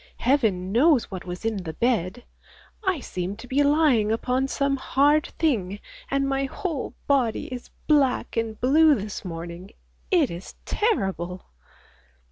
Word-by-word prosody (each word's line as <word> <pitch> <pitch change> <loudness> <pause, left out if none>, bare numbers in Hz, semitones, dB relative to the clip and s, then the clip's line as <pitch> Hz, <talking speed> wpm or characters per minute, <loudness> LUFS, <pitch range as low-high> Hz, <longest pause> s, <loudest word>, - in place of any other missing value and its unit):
Heaven 220 -9 +1
knows 260 +2 +3
what 185 -1 -6
was 180 +4 -7
in 225 -2 0
the 170 -4 -5
bed. 235 -2 0 0.6
I 375 -7 0
seemed 185 -1 -4
to 235 +3 -11
be 270 +3 +2
lying 285 -7 +3
upon 250 +4 0
some 275 0 0
hard 290 +3 +3
thing, 205 - 0 0.3
and 275 0 +1
my 275 0 0
whole 305 0 -4
body 255 -6 +1
is 245 - -8 0.2
black 285 -4 +2
and 225 -2 -2
blue 300 +4 +5
this 210 -3 -5
morning. 170 +1 -7 0.4
It 340 -8 +3
is 170 +2 -8
terrible! 190 - -1
245 Hz, 140 wpm, -25 LUFS, 195-285 Hz, 0.6 s, blue